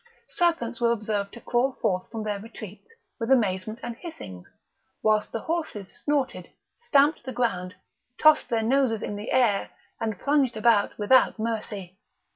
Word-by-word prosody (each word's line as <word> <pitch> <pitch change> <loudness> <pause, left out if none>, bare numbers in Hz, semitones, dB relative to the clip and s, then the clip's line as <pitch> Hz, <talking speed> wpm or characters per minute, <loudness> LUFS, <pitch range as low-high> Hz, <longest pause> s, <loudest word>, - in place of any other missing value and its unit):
Serpents 250 -10 0
were 235 -1 +4
observed 210 -3 -2
to 235 - -10
crawl 250 +2 +1
forth 185 -5 -1
from 225 -1 -5
their 210 -1 -2
retreats 215 - -10 0.3
with 230 0 -3
amazement 215 -4 +1
and 240 -1 -4
hissings, 95 - -9 0.5
whilst 215 -1 +2
the 225 - -3
horses 315 - -4
snorted, 285 -3 -1 0.3
stamped 295 -9 +3
the 260 - -5
ground, 190 -7 -1 0.4
tossed 310 0 +5
their 225 -1 +1
noses 240 -2 +2
in 205 - -3
the 205 +3 -6
air, 230 -6 +2 0.3
and 220 -3 -2
plunged 275 -3 +1
about 215 -2 +3
without 235 +5 +4
mercy. 210 -4 -4
225 Hz, 150 wpm, -26 LUFS, 205-260 Hz, 0.5 s, tossed